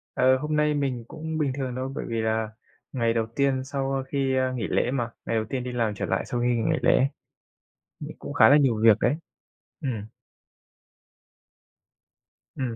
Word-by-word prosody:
Ờ, 130 +1 +4
hôm 150 +3 -2
nay 150 0 +3
mình 135 -5 -1
cũng 160 +3 -5
bình 145 -4 +1
thường 130 -2 -3
đâu, 130 +1 -3
bởi - - -4
vì 115 -1 -1
là 110 0 0 0.4
ngày 115 -3 +1
đầu 115 -1 +1
tiên 135 -2 +1
sau 135 0 -2
khi, 135 -1 0
a, 130 0 +1
nghỉ 125 -2 -3
lễ 125 - +1
mà, 120 -3 -1 0.2
ngày 115 - -1
đầu 110 -1 0
tiên 130 -2 -2
đi 125 - -4
làm 115 -3 0
trở - - -3
lại - - -1
sau 120 - -3
khi 120 - +2
nghỉ 120 -2 +1
ngày - - +1
lễ. 130 +2 +4 0.9
Ừ, - - -6
cũng - - -7
khá - - +7
là 145 - +7
nhiều 125 -7 +2
việc 110 -2 +7
đấy. - - +2 0.7
Ừ. 145 - -3 2.7
Ừ, 125 -3 -3
130 Hz, 195 wpm, -26 LUFS, 115-140 Hz, 2.7 s, khá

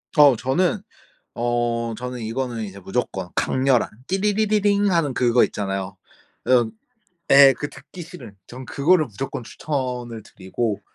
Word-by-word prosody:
어 145 -5 +7
저는 175 - 0 0.5
어 120 -1 -1
저는 125 0 -6
이거는 115 0 -3
이제 100 -1 -10
무조건 95 -2 -3
강렬한 130 -2 +1 0.2
띠리리리링 205 0 +1
하는 165 -6 +1
그거 120 -1 +3
있잖아요. 95 -2 -4 0.5
어 120 -3 +3 0.6
예 140 0 +9
그 145 +3 -5
듣기 185 - -13
싫은. 150 - -10
전 130 +2 -10
그거를 155 +6 +2
무조건 125 +1 -6
추천을 125 -6 -4
드리고 100 +3 -4
125 Hz, 275 characters per minute, -22 LUFS, 115-150 Hz, 0.6 s, 예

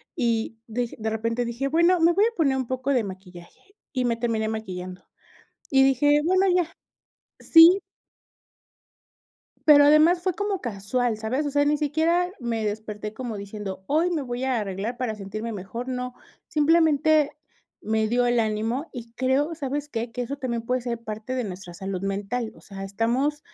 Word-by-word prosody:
y 230 -4 -1
de 240 +1 -3
de 220 0 -1
repente 230 +2 -1
dije: 235 +4 -2
"Bueno, 340 +4 +3
me 335 +1 +5
voy 405 +4 +4
a 465 0 -1
poner 275 -5 +2
un 260 -3 -2
poco 260 +2 -2
de 245 -4 +2
maquillaje", 185 - -11 0.2
y 255 -3 -1
me 230 -1 0
terminé 225 -2 -1
maquillando, 185 -4 -6 0.7
y 270 -1 +5
dije: 290 +3 +4
"Bueno, 375 +3 +3
ya", 345 -2 +1 0.7
sí 340 +4 +7 1.9
pero 290 -1 +9
además 315 +4 +5
fue 370 -1 +1
como 405 0 -2
casual, 225 +1 -1
¿sabes?, 250 +7 -1
o 290 - -2
sea, 285 +1 +2
ni 295 +1 +2
siquiera 320 +4 +1
me 230 -3 -2
desperté 210 0 -4
como 235 -2 -5
diciendo, 200 -1 -7
hoy 330 +5 +2
me 305 -4 -1
voy 245 0 -4
a 255 -4 +1
arreglar 205 +4 -4
para 240 -4 -3
sentirme 215 +3 -5
mejor, 220 +6 -6
no, 250 -1 -4 0.3
simplemente, 310 -1 +3 0.5
me 220 0 0
dio 245 +2 +2
el 240 0 +2
ánimo 225 +7 -1
y 235 -3 -9
creo, 270 +6 0
¿sabes 290 0 -3
qué?, 230 -2 -4
que 250 - -3
eso 275 +4 -4
también 240 -4 -3
puede 250 +1 -1
ser 235 -2 -4
parte 220 +3 -5
de 255 - -1
nuestra 185 -4 -7
salud 190 0 -4
mental, 205 +4 -3
o - - -17
sea, 195 -1 -8
estamos 240 +9 0
245 Hz, 175 wpm, -25 LUFS, 220-290 Hz, 1.9 s, pero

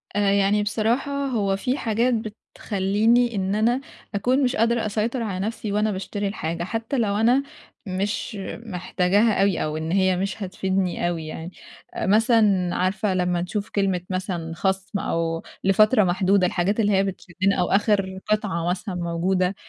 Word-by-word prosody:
آآ 205 -1 +3
يعني 200 +1 +3
بصراحة 225 +6 0 0.2
هو 200 -6 0
في 250 +7 -1
حاجات 235 +2 +1
بتخلّيني 220 +1 0
إن 195 +1 -1
أنا 240 +5 +2 0.3
أكون 255 +7 +2
مش 255 0 +1
قادرة 230 +1 +2
أسيطر 220 +4 -1
على 190 -4 -3
نَفْسي 220 -2 -4
وأنا 210 +1 +1
باشتري 200 +1 -3
الحاجة، 170 -4 -3
حتّى 225 +8 -3
لو 205 -4 +1
أنا 245 +6 +3 0.4
مش 200 +4 -2 0.3
محتاجاها 195 +2 +1
أوي 195 -3 +2
أو 155 0 -2
إن 160 +1 -3
هي 185 -1 +2
مش 195 +2 -3
هتفيدني 190 -1 -1
أوي 165 -2 -3
يعني. 160 +2 -7 0.4
آآ - - -3
مثلًا 210 -3 +3
عارفة 190 +2 0
لمّا 180 -1 0
نشوف 200 +4 -3
كلمة 195 -3 0
مثلًا 180 -3 -3
خَصْم 190 +2 -1
أو 165 0 -2 0.2
لفترة 215 +4 +5
محدودة- 185 +1 +2
الحاجات 190 +5 0
اللي 210 -2 +3
هي 195 -1 +3
بتشدّنا- 190 0 -1
أو 175 - +2
آخِر 195 -2 +1
قطعة 195 -6 0
مثلًا 180 +1 -3
موجودة؟ 180 +2 0
195 Hz, 155 wpm, -23 LUFS, 185-215 Hz, 0.4 s, لفترة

